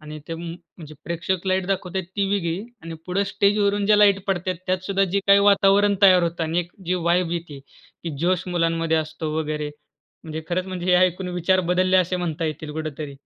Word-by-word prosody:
आणि 155 0 -9
ते 165 - -3
म 165 - -8 0.4
म्हणजे 155 -2 -10
प्रेक्षक 170 +2 -3
लाईट 185 -1 0
दाखवतायेत 190 -1 -2
ती 200 -1 +1
वेगळी 170 -4 -1 0.2
आणि 165 0 -7
पुढे 190 +2 0
स्टेजवरून 200 0 +1
जे 210 0 +5
लाईट 200 -2 +5
पडते 185 -1 -1
त्यात 185 0 +1
सुद्धा 195 0 +1
जे 200 - +2
काही 200 0 +8
वातावरण 200 0 +4
तयार 185 -2 +7
होतं 170 0 -2
आणि 160 +2 -1
एक 175 0 -9 0.2
जी 180 - +1
वाइब 175 0 +2
येते, 170 -4 -5 0.4
की 165 - -4
जोश 180 +1 +1
मुलांमध्ये 165 -2 0
असतो. 155 0 -4
वगैरे 150 -1 -3 0.6
म्हणजे 160 0 -6
खरंच, 185 +1 -1
म्हणजे 185 -1 -5
हे 185 - +3
ऐकून 180 +1 -4
विचार 185 +2 +2
बदलले, 185 +1 +3
असे 185 0 +2
म्हणता 165 -2 -3
येतील 155 0 -5
कुठेतरी, 155 -2 -5
180 Hz, 195 wpm, -23 LUFS, 165-190 Hz, 0.6 s, काही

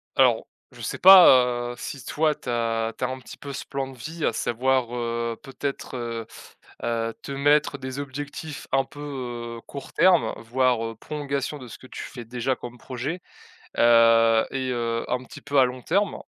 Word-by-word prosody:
Alors, - - +4 0.2
je - - -13
sais - - -3
pas, 125 -10 +7
heu, - - -8
si 135 -3 -7
toi 155 0 +1
tu 125 - -8
as 115 -1 0
tu - - -5
as - - +2
un 130 0 -5
petit 130 - -12
peu 140 -1 -8
ce 135 - -5
plan 135 -1 -3
de 130 - -14
vie 155 +6 -4
à - - +1
savoir, 125 +2 0
heu, 115 -1 -2
peut-être, 135 -1 -5
heu 115 -2 -4 0.6
heu, 115 -1 -1
te 140 - -6
mettre 145 +1 +3
des 130 0 -6
objectifs 145 +2 -6
un 135 0 +3
peu, 125 -5 -6
heu, - - -10
court 140 -2 -9
terme, 185 -3 +4
voire, 120 0 +1
heu, 115 0 -4
prolongation 140 +2 -4
de 130 - -10
ce - - -9
que - - -14
tu - - -7
fais 120 -3 -8
déjà 125 +3 -2
comme 120 0 -9
projet? 135 +9 -5 0.6
Heu 115 -1 +6
et 130 -1 -2
heu, 115 -1 -1
un 125 0 -1
petit - - -12
peu 145 -1 +1
à 130 - +7
long 125 0 -5
terme. 195 +8 0
130 Hz, 195 wpm, -25 LUFS, 120-140 Hz, 0.6 s, pas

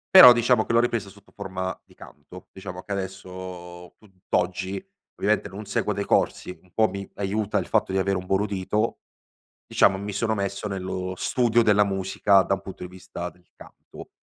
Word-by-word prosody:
però 125 -10 +13
diciamo 120 -1 +3
che - - -4
l'ho 115 - +5
ripresa 115 -4 0
sotto 100 +1 -19
forma 95 -2 -4
di - - -22
canto. 80 +5 -14
Diciamo 95 -1 -8
che 100 - -5
adesso 90 -2 -7
tutt'oggi, 95 -1 -3 0.4
ovviamente - - +1
non - - -8
seguo - - -1
dei - - -2
corsi, 90 - 0
un 90 - -26
po' 110 -1 +4
mi 100 0 -6
aiuta 100 +1 -1
il - - -1
fatto - - +1
di 95 - 0
avere 95 +1 +1
un 90 - -6
buon 95 +1 +1
udito, 105 +2 -1 0.7
diciamo 95 - +3
mi 100 +2 -5
sono 110 +3 0
messo 100 +1 -3
nello 95 -1 -4
studio 120 +2 +2
della 105 -2 +4
musica 95 0 +3
da 95 - 0
un 95 - -11
punto 95 -2 -9
di 90 - -7
vista 90 -1 -7
del 90 0 -25
canto. - - -14
95 Hz, 185 wpm, -25 LUFS, 95-105 Hz, 0.7 s, però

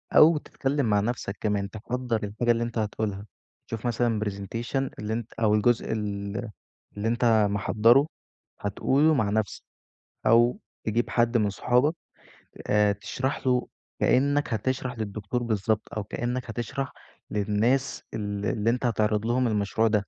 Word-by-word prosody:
أو 155 0 +8
تتكلّم 140 -1 -1
مع 105 -2 +3
نفسك 105 -2 -2
كمان، 100 -2 0
تحضّر 115 +1 -3
الحاجة 110 +4 0
اللي 115 0 +1
أنت 120 0 -4
هتقولها، 105 -2 -2 0.4
شوف 115 +1 -6
مثلًا 115 -2 +1
presentation 115 +7 -3
اللي 105 +1 -3
أنت 115 0 -4
أو 110 -2 +2
الجزء 115 +2 +2
ال 105 +1 -3 0.5
اللي 105 +2 -1
أنت 115 -3 +3
محضّره 115 +7 +4 0.5
هتقوله 140 +9 +2
مع 110 -7 +1
نفسك، 110 -1 -1 0.6
أو 120 +1 +5 0.3
تجيب 115 +2 0
حد 120 0 +2
من 105 -2 +2
صحابك 125 +9 +2 0.7
آآ، 105 0 +4
تشرح 130 +6 -3
له 125 -1 +2 0.3
كأنّك 140 0 +2
هتشرح 125 +2 -2
للدكتور 110 +3 -3
بالضبط، 110 -1 0 0.2
أو 105 - -1
كأنّك 120 +3 -3
هتشرح 120 +4 -3 0.4
للناس 110 +6 +1
ال 105 -2 -3
اللي 110 +3 +1
أنت 125 +1 0
هتعرض 105 -2 +1
لهم 125 +2 +2
المشروع 105 +1 +1
ده، 105 -3 +1
115 Hz, 140 wpm, -26 LUFS, 105-125 Hz, 0.7 s, أو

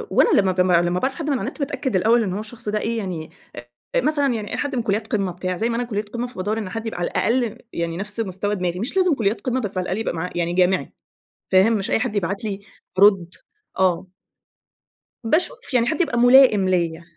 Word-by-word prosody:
وأنا - - +5
لما 190 -1 +1
ب 185 0 +1
لمّا 175 0 +2
باعرف 265 +1 -1
حد 315 -3 -4
من 275 -3 +1
على - - -5
النت 280 - -7
باتأكّد 275 -4 -2
الأوّل 225 +5 +3
إنّه 190 -2 -2
هو - - -3
الشخص 220 0 -7
ده 210 0 0
إيه؟ 230 +2 -2
يعني، 180 -7 -5 0.2
آآ، 120 0 -10 0.3
مثلًا 285 -1 +1
يعني 215 -3 -5
أي - - -2
حد 285 -1 -2
من 240 - 0
كليات 215 +1 -1
قمة 200 -4 -1
بتاع، 180 +1 -4
زي 225 +4 0
ما 230 - -1
أنا 240 - 0
كلية 215 -3 -3
قمة 235 +4 -5
فبادور 215 -2 -3
إن 210 -4 -4
حد 225 +4 -5
يبقى 225 -5 -4
على 175 - 0
الأقل 235 -1 0 0.2
يعني 170 0 -3
نفس 210 +3 -4
مستوى 205 0 -2
دماغي، 180 -2 -2
مش 250 - -3
لازم 365 -3 +4
كليات 210 -2 -1
قمة 255 +2 -1
بس 200 -4 -3
على 185 - 0
الأقل 185 +2 -2
يبقى 225 - -2
معاه 170 +2 -3
يعني 175 0 -1
جامعي، 180 -4 +1 0.6
فاهم؟ 190 +4 +5
مش 205 -3 -1
أي - - +2
حد 220 -2 -2
يبعت 195 +2 -2
لي 200 -2 -3 0.4
أرد. 190 -4 +4 0.4
آه. 185 -1 +2 1.2
باشوف 320 - -1
يعني 240 -1 +3
حد 320 +3 0
يبقى 245 -8 0
ملائم 245 -6 +6
ليَّ، 170 -2 0
210 Hz, 230 wpm, -22 LUFS, 185-240 Hz, 1.2 s, ملائم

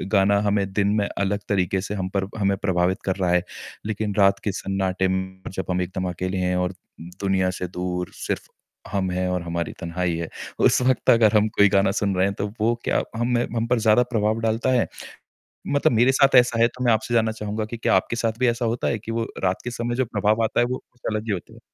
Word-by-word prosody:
गाना 100 +1 +4
हमें 100 -1 +1
दिन 100 0 +2
में 100 - 0
अलग 100 +1 -1
तरीके 95 -1 +1
से - - -2
हम 95 -2 -3
पर 95 -1 0
हमें 100 -1 +1
प्रभावित 95 0 0
कर 95 - 0
रहा 95 -2 0
है, 90 0 +3 0.4
लेकिन 105 -1 -2
रात 100 0 +5
के 105 - 0
सन्नाटे 95 -1 0
में 95 0 -7
जब 95 0 -4
हम 90 - 0
एकदम 90 0 -3
अकेले 95 +2 -3
हैं 90 0 0
और 90 +1 0
दु 85 -2 -15 0.2
दुनिया 95 -1 +2
से 90 0 -4
दूर, 90 0 -4
सिर्फ़ - - -4 0.4
हम 95 -2 0
हैं 90 +1 -1
और 90 -1 -1
हमारी 85 0 -3
तन्हाई 85 0 -2
है, 85 0 -3 0.3
उस - - +4
वक़्त 130 0 +2
अगर 115 -2 +5
हम 105 +1 +3
कोई 100 0 +6
गाना 100 0 +3
सुन 100 -1 0
रहे 90 +1 +3
हैं 100 - 0
तो 100 - -1
वो 110 +2 +2
क्या - - +1
हम 120 +1 0
में 120 - +2
हम 115 0 0
पर 120 -1 +2
ज़्यादा 110 +2 +4
प्रभाव 110 0 +1
डालता 115 +4 0
है? 125 -2 +2 0.8
मतलब 140 0 +2
मेरे 120 +4 +4
साथ 135 0 +4
ऐसा 120 -1 +1
है 115 - +6
तो 125 +1 -7
मैं 120 - +5
आपसे 110 +2 -1
जानना 110 -1 +3
चाहूँगा 105 0 -4
कि 115 +2 -7
क्या 115 - +2
आपके - - +1
साथ 115 0 -2
भी 130 - +3
ऐसा 120 +1 0
होता 115 +1 -1
है 115 - 0
कि 115 +2 -7
वो 115 0 -1 0.2
रात 95 0 0
के 125 - -4
समय 120 0 -3
जो 130 +1 +1
प्रभाव 110 0 +1
आता 110 - 0
है, 120 - +4
वो 125 +1 -4
कुछ 125 - -32
अलग 110 0 -2
ही 110 - -2
होता 95 -3 -5
है? - - -14
100 Hz, 245 wpm, -23 LUFS, 95-115 Hz, 0.8 s, कोई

